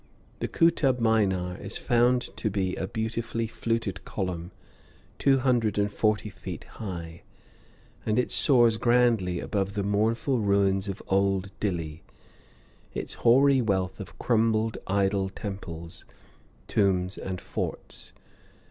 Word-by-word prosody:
The -, -, -1 dB
Kootub 150 Hz, -6 st, +3 dB
Minar 95 Hz, -6 st, +1 dB
is 100 Hz, 0 st, -4 dB
found 120 Hz, +1 st, +2 dB
to 110 Hz, -, -1 dB
be 95 Hz, -2 st, -1 dB
a 95 Hz, -, -3 dB
beautifully 115 Hz, +1 st, -2 dB
fluted 115 Hz, -3 st, -2 dB
column, 90 Hz, -3 st, -4 dB, 0.7 s
two 135 Hz, -1 st, +4 dB
hundred 125 Hz, -5 st, +1 dB
and 100 Hz, 0 st, +1 dB
forty 105 Hz, 0 st, +1 dB
feet -, -, -7 dB
high, 85 Hz, -5 st, -7 dB, 0.8 s
and 110 Hz, -, 0 dB
it 125 Hz, -, +1 dB
soars 120 Hz, -5 st, +5 dB
grandly 115 Hz, -7 st, +2 dB
above 100 Hz, +1 st, -2 dB
the 100 Hz, -, 0 dB
mournful 110 Hz, +6 st, +1 dB
ruins 100 Hz, -1 st, +2 dB
of 95 Hz, -, -5 dB
old 95 Hz, 0 st, +1 dB
Dilli, 85 Hz, -6 st, -3 dB, 0.9 s
its -, -, -3 dB
hoary 135 Hz, +3 st, +5 dB
wealth 95 Hz, -5 st, -1 dB
of -, -, -9 dB
crumbled 110 Hz, -1 st, +1 dB
idol 95 Hz, 0 st, +1 dB
temples, 85 Hz, -5 st, -7 dB, 0.6 s
tombs, 95 Hz, -2 st, +1 dB
and 95 Hz, -1 st, -4 dB
forts. -, -, -5 dB
105 Hz, 120 wpm, -27 LUFS, 95-115 Hz, 0.9 s, soars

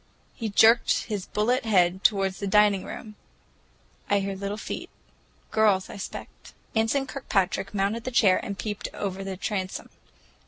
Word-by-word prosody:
He 225 Hz, -2 st, -4 dB
jerked 225 Hz, +3 st, +5 dB
his 205 Hz, -5 st, -4 dB
bullet 240 Hz, +5 st, +1 dB
head 190 Hz, -4 st, +2 dB
toward 195 Hz, -2 st, +3 dB
the 200 Hz, +1 st, -5 dB
dining 205 Hz, -1 st, +4 dB
room. 215 Hz, -1 st, -8 dB, 0.9 s
"I 205 Hz, -, +4 dB
hear 195 Hz, 0 st, -3 dB
little 200 Hz, +2 st, -4 dB
feet,—girls, 215 Hz, -2 st, -2 dB
I -, -, -8 dB
'spect." 195 Hz, -, -9 dB, 0.2 s
Anson 225 Hz, +5 st, +2 dB
Kirkpatrick 200 Hz, -8 st, -1 dB
mounted 205 Hz, +5 st, -1 dB
a -, -, +2 dB
chair 210 Hz, -6 st, +4 dB
and 200 Hz, -, -5 dB
peeped 210 Hz, -1 st, -4 dB
over 195 Hz, -1 st, -3 dB
the 195 Hz, -1 st, -5 dB
transom. 190 Hz, -1 st, -4 dB
205 Hz, 145 wpm, -26 LUFS, 195-220 Hz, 0.9 s, jerked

